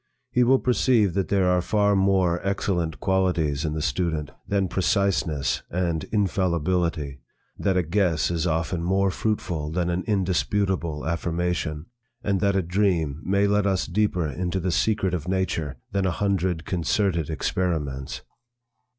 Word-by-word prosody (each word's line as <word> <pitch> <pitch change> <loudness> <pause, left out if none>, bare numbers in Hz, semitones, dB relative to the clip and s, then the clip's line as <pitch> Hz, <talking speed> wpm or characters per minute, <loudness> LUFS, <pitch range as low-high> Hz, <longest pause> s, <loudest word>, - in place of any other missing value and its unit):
He 125 - +3
will 130 +2 +5
perceive 120 -6 +2
that 95 -1 0
there 100 -2 +2
are 90 0 +3
far 105 +1 +2
more 95 -3 +2
excellent 90 -7 -1
qualities 85 -6 +1
in 75 -2 -1
the 80 -1 -2
student 80 -5 -1 0.2
than 100 -1 +1
preciseness 90 - 0
and 85 -3 -1
infallibility; 85 -7 0 0.4
that 95 -2 +1
a 90 - +2
guess 85 -2 +1
is 85 +1 0
often 85 +1 -1
more 95 +2 +2
fruitful 85 -8 -2
than 85 +2 -1
an 90 +1 -1
indisputable 95 -5 0
affirmation, 85 -2 -2 0.4
and 100 -2 +1
that 100 0 +2
a 95 - +2
dream 85 -5 0
may 100 +1 +2
let 100 0 +2
us 95 -3 +1
deeper 90 -3 0
into 90 +6 -2
the 90 0 -1
secret 100 -1 +1
of 90 -2 -3
nature 90 -6 -1
than 100 -1 +1
a - - +2
hundred 90 -4 -1
concerted 85 -1 0
experiments. 80 -5 -2
90 Hz, 145 wpm, -25 LUFS, 80-100 Hz, 0.4 s, will